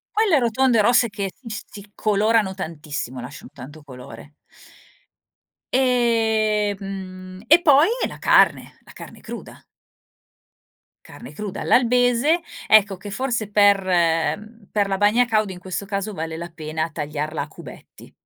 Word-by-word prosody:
Quelle 420 -7 +3
rotonde 245 -1 +2
rosse 235 +2 +3
che 200 -2 -4
s 225 -3 -6
si 205 0 -12
colorano 215 -1 +1
tantissimo 150 -8 -6
lasciano 125 +4 -10
tanto 145 +4 -12
colore, 140 +1 -12 1.3
e, 225 -5 +1
mhmm, 185 -1 -8
e 325 +6 +6
poi 295 0 +5 0.2
la - - -10
carne - - +3
la - - -16
carne - - -12
cruda. - - -10 1.4
Carne - - -12
cruda 205 -2 -6
all'albese 245 +5 +2 0.3
ecco 205 -2 +4
che 200 +3 -10
forse 235 -2 -2
per 205 -1 +4 0.9
per 205 -2 +1
la 195 -1 -1
bagna 210 +5 +3
cauda 215 -4 0
in 180 - -9
questo 185 +2 -5
caso 200 +1 -4
vale 160 -2 -5
la 170 +1 -7
pena 160 -1 -4
tagliarla 150 0 -4
a - - -5
cubetti - - -14
205 Hz, 130 wpm, -22 LUFS, 175-230 Hz, 1.4 s, e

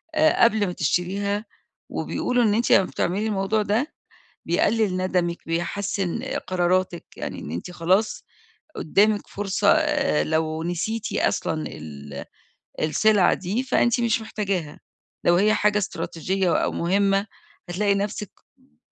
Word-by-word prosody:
آآ، 310 -3 +4
قبل 220 -4 +4
ما 180 - -3
تشتريها، 200 +6 -1 0.4
وبيقولوا 245 -1 0
إن 210 -2 +3
أنتِ 235 - +1
لمّا 195 - +7
بتعملي 195 +6 -1
الموضوع 210 +1 0
ده، 220 +9 0 0.5
بيقلل 205 +3 +2
ندمِك، 180 -2 0
بيحسن 185 +5 -2 0.3
قراراتِك، 180 -1 0
يعني - - -5
إن - - -7
أنتِ 85 - -5
خلاص، 190 - +1 0.5
قدامِك 205 +5 +2
فرصة، 195 -2 +1 0.5
لو 160 0 -1
نسيتِ 205 +6 -2
أصلًا 155 -1 0
ال 70 -2 -8 0.6
السلعة 200 +5 +3
دي، 195 +7 -2
فأنتِ 240 -2 +2
مش 230 -1 +1
محتاجاها، 190 -8 -3 0.4
لو 175 - +5
هي 210 +3 +4
حاجة 210 0 +2
إستراتيجية 190 -1 -1
أو - - -1
مهمة، 195 +3 +1 0.4
هتلاقي 200 +3 +1
نفسِك 200 0 -3 0.3
ب 260 +1 -31
195 Hz, 125 wpm, -24 LUFS, 175-215 Hz, 0.6 s, لمّا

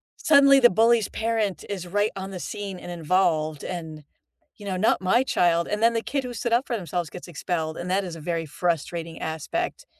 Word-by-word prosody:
suddenly 275 -2 +6
the 240 -2 +7
bully's 225 +2 +3
parent 220 -6 -1
is 195 -3 -4
right 205 +4 +1
on 190 0 -6
the 185 - -6
scene 200 -1 -5
and 175 - -8
involved, 160 -3 0
and, 160 -4 -6 0.5
you 205 - -11
know, 190 -2 -2
not 205 +5 +2
my 190 +7 +3
child, 170 -9 +2
and 210 +1 -2
then 230 0 +4
the 230 - 0
kid 270 +2 -2
who 245 -1 -6
stood 235 0 -3
up 240 +4 +3
for 240 - -1
themselves 175 -3 -3
gets 180 - -10
expelled, 160 -1 -3
and 180 +1 -5
that 195 +2 +1
is 175 -3 -6
a 165 - -9
very 165 0 -2
frustrating 165 +1 -3
aspect. 340 - -3
185 Hz, 210 wpm, -25 LUFS, 170-225 Hz, 0.5 s, the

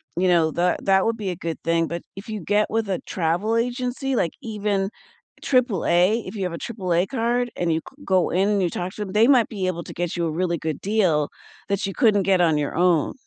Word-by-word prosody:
you 185 +1 +1
know, 165 -3 +3
that 175 +3 0
that 190 -1 +4
would 225 0 0
be 195 -4 -3
a - - -4
good 165 -1 -4
thing, 165 0 +1
but 170 0 -5
if 195 +3 -10
you 215 -3 -4
get 205 +4 +1
with 225 -1 -1
a 185 - 0
travel 180 +7 0
agency, 250 +3 -1
like 170 -8 0
even 205 -3 -1 0.5
AAA, 215 -5 +2
if - - -7
you 195 - -3
have 180 -2 -2
a - - -4
AAA 185 -5 -1
card 245 0 0
and 170 -2 0
you 160 - +1
g 285 +2 -15
go 185 -2 +2
in 190 +3 +2
and 205 -2 +2
you 175 - +1
talk 180 +3 -4
to - - -8
'em, 195 -2 -4
they 220 +2 +5
might 250 -5 +4
be 200 -4 -3
able 170 -2 -2
to - - -8
get 175 -1 -3
you 170 -1 -1
a - - -2
really 170 +1 -1
good 155 -3 -3
deal 185 -8 +1 0.4
that 200 0 0
you 195 - -4
couldn't 215 -6 +4
get 190 -1 +3
on 160 -3 +3
your 145 0 -2
own. 175 -3 +3
190 Hz, 245 wpm, -23 LUFS, 170-220 Hz, 0.5 s, they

